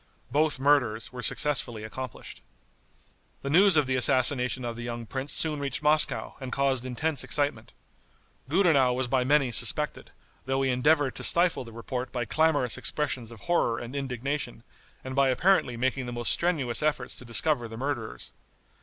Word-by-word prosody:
Both 150 Hz, +2 st, +1 dB
murders 130 Hz, -5 st, +1 dB
were 125 Hz, -, -7 dB
successfully 120 Hz, -6 st, 0 dB
accomplished. 125 Hz, +2 st, -8 dB, 1.0 s
The 140 Hz, -, -3 dB
news 190 Hz, +1 st, +5 dB
of 150 Hz, -, +3 dB
the 130 Hz, 0 st, -1 dB
assassination 125 Hz, -1 st, +1 dB
of 120 Hz, -1 st, -4 dB
the 120 Hz, -, -8 dB
young 120 Hz, 0 st, -6 dB
prince 135 Hz, +5 st, -4 dB
soon 155 Hz, -2 st, +1 dB
reached 140 Hz, +1 st, -4 dB
Moscow, 150 Hz, +1 st, +3 dB
and 130 Hz, -2 st, -7 dB
caused 135 Hz, -2 st, 0 dB
intense 150 Hz, +4 st, -2 dB
excitement. 145 Hz, -7 st, -2 dB, 0.8 s
Gudenow 150 Hz, -7 st, +3 dB
was 125 Hz, 0 st, -2 dB
by 130 Hz, 0 st, +1 dB
many 140 Hz, -1 st, +2 dB
suspected, 125 Hz, +7 st, +2 dB, 0.4 s
though 135 Hz, 0 st, 0 dB
he 135 Hz, -, +1 dB
endeavored 145 Hz, +2 st, +2 dB
to -, -, -6 dB
stifle 175 Hz, -4 st, +3 dB
the 115 Hz, -, -12 dB
report 125 Hz, +3 st, -6 dB
by 120 Hz, -2 st, -3 dB
clamorous 150 Hz, -4 st, +1 dB
expressions 130 Hz, -6 st, -2 dB
of 115 Hz, -3 st, -13 dB
horror 120 Hz, -8 st, 0 dB
and 120 Hz, +3 st, -8 dB
indignation, 135 Hz, -2 st, -4 dB, 0.4 s
and 130 Hz, 0 st, -7 dB
by 140 Hz, -1 st, +3 dB
apparently 130 Hz, -3 st, +1 dB
making 130 Hz, +1 st, -2 dB
the -, -, -5 dB
most 120 Hz, -1 st, +1 dB
strenuous 150 Hz, -9 st, +1 dB
efforts 150 Hz, -5 st, -1 dB
to -, -, -11 dB
discover 120 Hz, +1 st, +2 dB
the 115 Hz, 0 st, -10 dB
murderers. 125 Hz, -4 st, -5 dB
130 Hz, 165 wpm, -27 LUFS, 120-150 Hz, 1.0 s, news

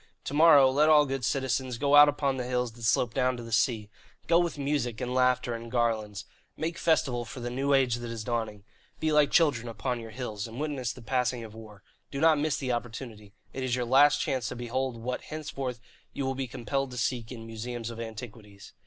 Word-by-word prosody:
"To -, -, -5 dB
morrow 145 Hz, -4 st, +7 dB
let 150 Hz, +3 st, +3 dB
all 150 Hz, -1 st, +6 dB
good 135 Hz, -2 st, -3 dB
citizens 130 Hz, -1 st, -1 dB
go 140 Hz, +2 st, 0 dB
out 145 Hz, 0 st, +9 dB
upon 140 Hz, -2 st, -1 dB
the 125 Hz, -, -2 dB
hills 125 Hz, -1 st, -1 dB
that 120 Hz, +1 st, -16 dB
slope 115 Hz, 0 st, +1 dB
down 130 Hz, -1 st, +1 dB
to 120 Hz, -, -7 dB
the 115 Hz, -, -9 dB
sea. 115 Hz, -1 st, +1 dB, 0.4 s
Go 170 Hz, 0 st, +4 dB
with 170 Hz, -3 st, -1 dB
music 140 Hz, -5 st, -1 dB
and 125 Hz, -1 st, -3 dB
laughter 125 Hz, -1 st, +2 dB
and 115 Hz, 0 st, -7 dB
garlands. 110 Hz, -4 st, -1 dB, 0.3 s
Make 165 Hz, +2 st, -3 dB
festival 130 Hz, -7 st, +1 dB
for 120 Hz, +3 st, -9 dB
the 120 Hz, 0 st, -4 dB
new 135 Hz, +3 st, +1 dB
age 125 Hz, -3 st, +2 dB
that 120 Hz, 0 st, -6 dB
is 115 Hz, -2 st, -5 dB
dawning. 110 Hz, -3 st, -3 dB, 0.4 s
Be 160 Hz, 0 st, 0 dB
like 150 Hz, -2 st, +4 dB
children 140 Hz, -8 st, +2 dB
upon 115 Hz, +2 st, -3 dB
your 115 Hz, -1 st, -8 dB
hills, 110 Hz, -2 st, -5 dB
and 115 Hz, +3 st, -9 dB
witness 140 Hz, -5 st, -2 dB
the 125 Hz, -, -12 dB
passing 125 Hz, -1 st, -1 dB
of 110 Hz, -2 st, -10 dB
war. 105 Hz, -2 st, -13 dB, 0.3 s
Do 140 Hz, -, -5 dB
not 160 Hz, -1 st, +4 dB
miss 150 Hz, 0 st, 0 dB
the 130 Hz, -2 st, -2 dB
opportunity. 115 Hz, -3 st, -6 dB, 0.2 s
It 130 Hz, -, -4 dB
is 125 Hz, -2 st, 0 dB
your 125 Hz, -1 st, -1 dB
last 145 Hz, +4 st, +5 dB
chance 130 Hz, -6 st, -1 dB
to -, -, -6 dB
behold 125 Hz, +1 st, -3 dB
what 125 Hz, +2 st, -4 dB
henceforth 135 Hz, -5 st, -5 dB, 0.3 s
you 140 Hz, -, -3 dB
will 135 Hz, -, 0 dB
be 135 Hz, 0 st, -4 dB
compelled 135 Hz, +3 st, -3 dB
to 125 Hz, -, -8 dB
seek 120 Hz, 0 st, -2 dB
in 115 Hz, -3 st, -8 dB
museums 115 Hz, +1 st, -5 dB
of 115 Hz, -, -9 dB
antiquities. 110 Hz, -3 st, -9 dB
125 Hz, 220 wpm, -28 LUFS, 115-135 Hz, 0.4 s, out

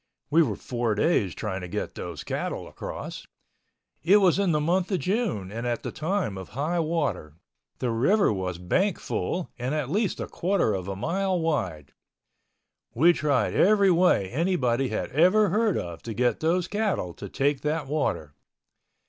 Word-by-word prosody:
We 165 Hz, +3 st, +6 dB
were 115 Hz, -10 st, +1 dB
four 120 Hz, -1 st, -2 dB
days 105 Hz, -, +1 dB
trying 95 Hz, -4 st, -4 dB
to 90 Hz, -, -6 dB
get -, -, -4 dB
those 85 Hz, -4 st, -6 dB
cattle -, -, -3 dB
across. -, -, -7 dB, 0.7 s
It 190 Hz, +6 st, +5 dB
was 190 Hz, -2 st, +4 dB
in 195 Hz, -3 st, +2 dB
the 150 Hz, -, +2 dB
month 180 Hz, +5 st, 0 dB
of 190 Hz, -, +2 dB
June 180 Hz, -, -1 dB
and 115 Hz, +3 st, -4 dB
at 120 Hz, -1 st, -2 dB
the -, -, -4 dB
time 155 Hz, -, -2 dB
of 95 Hz, -, -9 dB
high 165 Hz, +5 st, 0 dB
water—the 125 Hz, -, -3 dB
river 140 Hz, -, +3 dB
was 95 Hz, -3 st, -3 dB
bank 175 Hz, -, 0 dB
full 180 Hz, -1 st, -3 dB
and 125 Hz, +5 st, -2 dB
at 150 Hz, -3 st, -2 dB
least 205 Hz, +2 st, 0 dB
a -, -, -2 dB
quarter 185 Hz, -, 0 dB
of 95 Hz, -1 st, -4 dB
a 100 Hz, -, -3 dB
mile 185 Hz, -, -1 dB
wide. 105 Hz, -, -2 dB, 1.0 s
We 165 Hz, +8 st, +6 dB
tried 145 Hz, -5 st, +1 dB
every 200 Hz, -1 st, +4 dB
way 170 Hz, -, +3 dB
anybody 135 Hz, -, 0 dB
had -, -, -3 dB
ever 185 Hz, +8 st, +4 dB
heard 215 Hz, -1 st, +2 dB
of 85 Hz, -1 st, -5 dB
to 115 Hz, -2 st, -6 dB
get 125 Hz, 0 st, +1 dB
those 170 Hz, +3 st, +1 dB
cattle 205 Hz, -, -1 dB
to 100 Hz, -, -8 dB
take 140 Hz, +4 st, 0 dB
that 150 Hz, 0 st, -1 dB
water. 95 Hz, -, -2 dB
150 Hz, 170 wpm, -26 LUFS, -, 1.0 s, We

